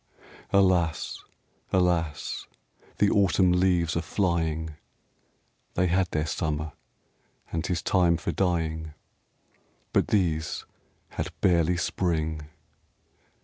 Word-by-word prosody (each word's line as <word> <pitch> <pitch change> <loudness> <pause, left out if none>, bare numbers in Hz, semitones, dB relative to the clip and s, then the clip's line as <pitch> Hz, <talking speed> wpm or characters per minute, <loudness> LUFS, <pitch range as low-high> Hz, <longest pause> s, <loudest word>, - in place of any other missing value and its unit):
Alas, 90 -4 +2 0.5
alas, 85 -5 0 0.5
the 105 - +4
Autumn 95 -2 +4
leaves 90 -2 +2
are 85 - +1
flying! 80 -2 0 1.0
They 90 - +2
had 90 +1 +2
their 75 0 -1
Summer 75 0 -2 0.8
and 80 -1 -1
'tis 85 -4 -2
time 90 -3 +3
for - - -2
dying. 80 -4 -1 1.0
But - - +3
these 80 -6 0 0.4
had - - -4
barely 85 -1 +3
Spring. 80 -4 -1
85 Hz, 95 wpm, -27 LUFS, 80-90 Hz, 1.0 s, the